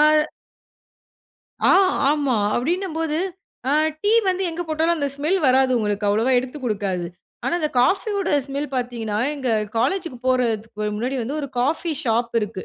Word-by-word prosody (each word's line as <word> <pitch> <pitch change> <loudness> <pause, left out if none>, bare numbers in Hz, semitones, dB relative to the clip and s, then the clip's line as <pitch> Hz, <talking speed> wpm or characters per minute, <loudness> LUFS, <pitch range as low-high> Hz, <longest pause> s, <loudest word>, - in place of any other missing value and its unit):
அ - - +7 1.6
ஆ, - - +6 0.4
ஆமா! 285 -4 +1 0.2
அப்படின்னும்போது, 325 +2 -1 0.5
அ - - +2 0.3
டீ 415 - +2 0.2
வந்து 370 +1 +1
எங்க 335 +1 -4
போட்டாலும் 325 +2 +1
அந்த 285 -2 -1
ஸ்மெல் 310 +7 +1
வராது 260 0 +4
உங்களுக்கு. 210 -1 -1
அவ்வளவா 225 +6 +2
எடுத்துக் 260 +2 -5
குடுக்காது. 195 -6 -1 0.4
ஆனா - - 0
இந்த 305 - 0
காஃபியோட 395 - +1 0.2
ஸ்மெல் 280 +1 -3
பார்த்தீங்கன்னா, 235 -4 -2 0.2
எங்க 265 -4 -3 0.3
காலேஜ்‌க்கு 310 +1 -1
போறதுக்கு 225 -4 0
முன்னாடி 250 +5 -2
வந்து, 280 +7 -3
ஒரு 280 - -4
காஃபி 315 +5 0
ஷாப் 235 0 0
இருக்கு. 210 -3 -5
260 Hz, 140 wpm, -22 LUFS, 230-315 Hz, 1.6 s, அ